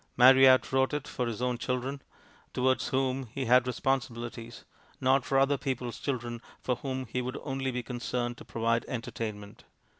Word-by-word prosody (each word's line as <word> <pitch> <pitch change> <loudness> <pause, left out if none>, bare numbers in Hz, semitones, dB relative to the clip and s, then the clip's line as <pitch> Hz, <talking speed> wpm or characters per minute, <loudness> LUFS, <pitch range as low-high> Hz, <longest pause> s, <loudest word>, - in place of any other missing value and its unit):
Marryat 130 +1 +7
wrote 130 +2 +2
it 150 - -4
for 125 -2 -2
his 115 +1 -3
own 125 -1 0
children, 130 +2 -2 0.5
towards 130 +1 +2
whom 130 -1 0
he 130 +4 -4
had 125 +1 +5
responsibilities; 120 -3 -3 0.3
not 130 0 +3
for 135 - 0
other 135 0 +3
people's 125 -3 -3
children, 120 -4 -3 0.2
for 125 -2 -1
whom 130 -1 -4
he 125 +2 -3
would 130 +2 -4
only 135 -2 -2
be 125 -1 -3
concerned 120 0 -3
to - - -9
provide 115 0 0
entertainment. 110 -4 -5
125 Hz, 160 wpm, -29 LUFS, 120-135 Hz, 0.5 s, Marryat